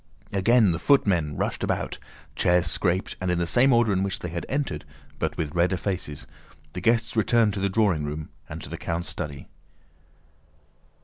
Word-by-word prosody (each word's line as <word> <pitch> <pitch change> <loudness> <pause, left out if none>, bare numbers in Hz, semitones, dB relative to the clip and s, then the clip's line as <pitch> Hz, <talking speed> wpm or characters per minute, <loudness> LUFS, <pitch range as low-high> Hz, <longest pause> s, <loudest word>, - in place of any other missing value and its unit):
Again 105 +1 +4
the 85 - -2
footmen 90 - +2
rushed - - -2
about, - - -2 0.4
chairs 90 -1 +3
scraped, 90 +3 0
and 90 - -1
in 90 - +1
the 85 - +1
same 125 +10 +4
order 115 -4 +4
in 95 - +1
which 95 -1 -1
they 90 - -6
had 85 +1 -5
entered 140 +1 -2 0.4
but - - -2
with 75 -3 -3
redder 90 +2 +2
faces, 90 -7 -4 0.5
the 90 - -5
guests 115 +3 +2
returned 110 -1 +3
to 100 - -3
the 100 0 +1
drawing 95 -7 +2
room 75 +1 -5 0.2
and 80 +2 -7
to - - -7
the - - -5
count's 85 +1 -3
study. 70 -2 -6
95 Hz, 180 wpm, -25 LUFS, 85-110 Hz, 0.5 s, Again